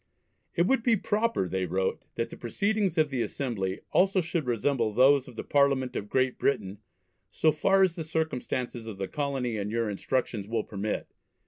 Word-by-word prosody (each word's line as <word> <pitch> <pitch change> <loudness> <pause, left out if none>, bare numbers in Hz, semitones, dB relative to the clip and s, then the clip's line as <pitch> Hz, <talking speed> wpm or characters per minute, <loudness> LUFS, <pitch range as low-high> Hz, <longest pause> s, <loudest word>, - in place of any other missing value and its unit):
"It 170 - +3
would 265 +5 +2
be 230 -1 +3
proper," 210 - 0
they 95 0 -1
wrote, 95 +2 -1
"that 115 - -2
the - - -7
Proceedings 200 - 0
of 155 -2 +3
the 130 -3 -1
Assembly 105 -8 -2
also 190 +1 +4
should 170 -4 -2
resemble 120 -1 +1
those 130 +4 +5
of - - -11
the - - -5
Parliament 135 -3 +2
of 105 - -4
Great 130 -1 +1
Britain 100 -7 0 0.5
so 155 +8 +3
far 195 +6 +3
as 180 -3 +2
the 165 - -4
circumstances 130 -7 -3
of 110 -3 -6
the 95 0 -3
Colony 135 -5 -2
and 100 0 -2
your 115 -1 -1
Instructions 105 -1 -2
will 115 -1 -1
permit. 105 +1 -4
130 Hz, 185 wpm, -28 LUFS, 110-160 Hz, 0.5 s, those